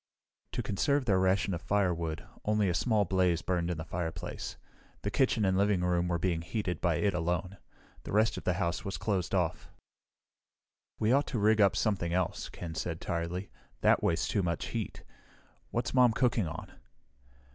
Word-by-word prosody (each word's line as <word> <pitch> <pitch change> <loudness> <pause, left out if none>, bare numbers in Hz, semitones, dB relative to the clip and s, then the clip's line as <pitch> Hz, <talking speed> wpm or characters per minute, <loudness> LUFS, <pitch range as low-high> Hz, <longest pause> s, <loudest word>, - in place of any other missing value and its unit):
To - - -2
conserve 140 +7 +1
their 100 -5 +3
ration 95 +1 +2
of 85 - -3
firewood, 85 -6 0 0.2
only 105 -1 +2
a - - +1
small 110 +1 +2
blaze 90 -2 +2
burned 90 -2 0
in 90 - -2
the 80 - -5
fireplace. 85 -1 -4 0.5
The 100 - -1
kitchen 120 -4 +2
and 95 -1 +2
living 100 -1 +2
room 90 0 +1
were 85 -1 +1
being 85 -1 0
heated 90 -1 -3
by 85 -2 +2
it 100 +3 +1
alone. 90 +3 -2 0.4
The - - -8
rest 110 +2 +3
of - - -6
the 90 - +1
house 85 -2 -1
was 95 - -4
closed 95 -4 -1
off. 90 -4 -1 1.3
"We 110 +1 +2
ought 140 +3 +3
to 125 - -2
rig 110 +1 +4
up 100 -2 +5
something 90 -6 0
else," 90 -1 -1
Ken 85 -2 -7
said 80 +1 -3
tiredly. 85 +3 -3 0.3
"That - - +4
wastes - - +1
too 100 - +1
much 85 -3 -2
heat. - - -4 0.7
What's 120 +1 -2
Mom 125 -3 +5
cooking 120 -5 +2
on?" 75 - -7
95 Hz, 180 wpm, -31 LUFS, 85-105 Hz, 1.3 s, up